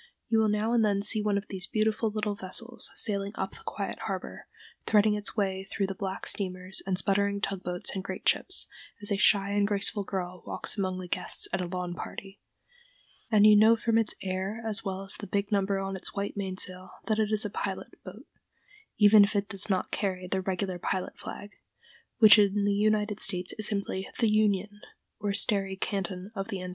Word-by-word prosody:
You 225 -1 +3
will 220 -1 +3
now 210 +2 0
and 235 -2 +3
then 200 -2 +1
see 215 +1 +2
one 210 -1 +1
of 200 - -5
these 185 -2 -3
beautiful 220 +1 0
little 210 -1 -2
vessels 230 +7 -2
sailing 200 -3 +1
up 190 0 -3
the - - -13
quiet - - -5
harbor, - - -6 0.4
threading 210 0 +4
its 210 +1 -3
way 190 -2 -1
through 195 +1 -2
the 195 - -3
black 190 0 -5
steamers 185 -1 +1
and 185 -1 0
sputtering 200 +1 +2
tug 195 -2 -2
boats 180 -1 -3
and 190 - -4
great 190 -1 -6
ships, - - +2 0.4
as 205 - 0
a 200 - +1
shy 200 0 +3
and 205 0 +2
graceful 205 0 +3
girl 180 -2 -5
walks - - 0
among 190 -3 -2
the 185 -1 -7
guests - - -1
at 190 - 0
a 180 - -3
lawn 180 0 -4
party, 195 +2 -9 0.9
and 210 -2 +5
you 215 0 +8
know 220 +2 +6
from 230 0 +1
its 225 - 0
air 190 +4 -3
as 220 0 +1
well 195 -1 -4
as 195 - 0
the 205 - -8
big 200 +2 -2
number 200 -1 +1
on 195 0 -3
its 190 - -4
white 200 0 -3
mainsail 185 -2 -2 0.2
that 215 -1 0
it 215 -1 +1
is 215 0 +4
a 205 - -3
pilot - - -5
boat, - - -11 0.7
even 210 0 +7
if 200 +1 0
it 200 0 0
does 200 +2 -2
not 190 -2 -1
carry 185 -3 -2
the 190 +1 -1
regular 185 -1 -3
pilot 185 +1 -3
flag, 205 0 -8 0.7
which 215 -2 +8
in 200 0 +2
the 205 - +2
United 210 0 +1
States 180 -3 +2
is 215 - +2
simply 200 -2 -3
the 225 -3 +2
"union" 205 -1 +1 0.4
or 205 - -1
starry 195 -1 +1
canton 195 0 -4
of 195 -2 -4
the 200 -4 -4
ensign. 180 0 -6
200 Hz, 205 wpm, -28 LUFS, 190-210 Hz, 0.9 s, you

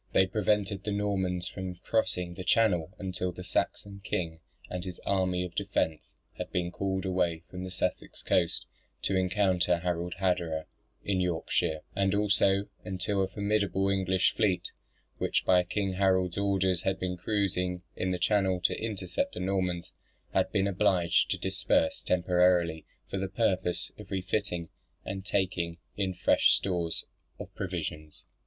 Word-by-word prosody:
They 95 - +6
prevented 100 0 0
the 105 - -2
Normans 95 -3 0
from 95 0 -5
crossing 90 -3 -1
the 90 - -6
Channel 95 -4 +3
until 90 -1 -2
the 90 +1 -8
Saxon 100 +2 -2
king 80 -4 -2 0.3
and 90 -1 -4
his 90 -1 -6
army 90 -2 +1
of 90 -1 -6
defence 80 -2 -1 0.2
had - - -4
been 90 -1 -1
called 95 +1 -2
away 90 -3 0
from 90 0 -5
the 95 - -5
Sussex 90 0 -3
coast - - +2 0.4
to 95 - +1
encounter 90 -2 +2
Harald 85 0 -2
Hardrada 90 -4 0 0.4
in 95 -2 +1
Yorkshire: 80 -2 0
and 100 0 +2
also 100 -1 +3 0.2
until 95 +2 0
a 95 - +2
formidable 100 -1 +1
English 95 -1 +2
fleet, 95 -4 +1 0.5
which - - +1
by 90 -1 +6
King 95 +1 -1
Harold's 95 -2 +2
orders 95 -2 +1
had 95 0 0
been 90 0 -2
cruising 90 -2 0
in 95 - -1
the 90 - 0
Channel 95 -1 +2
to - - +1
intercept 95 -5 -2
the - - -4
Normans, 90 -2 -1 0.4
had - - +2
been 95 - +2
obliged 95 -3 +3
to - - 0
disperse 280 - +1
temporarily 90 -2 +2 0.2
for 100 - -3
the 95 0 -2
purpose 95 -4 0
of - - -10
refitting 95 -2 -2 0.4
and 95 0 -4
taking 90 -4 -1 0.2
in 95 -2 -1
fresh - - +4
stores 85 -4 -1 0.3
of - - -9
provisions. 75 0 -5
95 Hz, 150 wpm, -30 LUFS, 90-100 Hz, 0.5 s, They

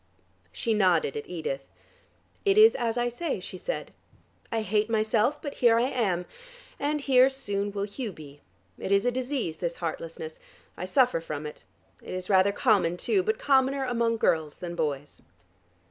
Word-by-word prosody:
She 230 - -1
nodded 180 -9 +2
at 145 - -5
Edith. 155 -6 -3 0.8
"It 400 0 +3
is 440 +1 +8
as 235 -1 -1
I 240 0 +1
say," 245 +8 -3
she - - -8
said. - - -4 0.6
"I 225 -1 0
hate 215 +2 +1
myself, 220 +5 +1
but 285 - -5
here 235 -2 +6
I 245 +3 +2
am, 190 -9 0 0.5
and 295 +1 -1
here 260 -1 +5
soon 205 -7 -2
will 200 0 -3
Hugh 210 +3 -4
be. 145 -4 -13 0.4
It - - -4
is 200 +2 +3
a 245 - +3
disease, 250 - -2
this 170 0 -3
heartlessness: 160 -1 -6 0.4
I 185 - -5
suffer 250 - +3
from 155 -2 -5
it. 150 - -9 0.4
It - - -7
is 185 +2 -4
rather 190 +1 +5
common 200 -6 +2
too, 390 - +1
but 440 +4 0
commoner 270 - +2
among 235 -2 +1
girls 160 -7 +1
than 175 -2 -6
boys." 145 -3 -3
215 Hz, 170 wpm, -27 LUFS, 175-255 Hz, 0.8 s, is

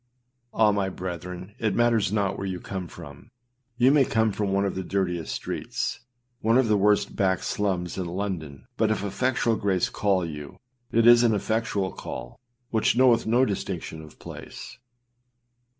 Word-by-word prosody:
Ah! 110 -1 +4
my 100 -2 0
brethren, 90 +1 -6
it 110 -4 0
matters 115 -4 +2
not 100 -2 0
where 95 - -4
you 90 -1 -3
come 95 -1 -5
from; 70 -3 -12 0.5
you 125 +2 +5
may 145 -1 +5
come 110 -3 +1
from 100 -1 -2
one 100 +1 +2
of 100 - -1
the 95 - -3
dirtiest 90 -3 -2
streets, - - -3 0.4
one 115 +2 +3
of 130 -3 +3
the 105 - +3
worst 105 0 +2
back 95 -2 +1
slums 95 -4 -1
in 90 - -2
London 85 -6 -4
but 110 -1 +2
if 110 -2 0
effectual 115 +3 +1
grace 95 -4 0
call 95 -4 +1
you, 75 -3 -8 0.3
it 115 0 +3
is 120 0 +8
an 115 -3 +3
effectual 105 -2 -1
call, - - -8 0.3
which 110 +1 +2
knoweth 125 -3 +4
no 120 +4 +4
distinction 90 -6 -4
of 75 -1 -14
place. - - -10
100 Hz, 165 wpm, -26 LUFS, 90-110 Hz, 0.5 s, is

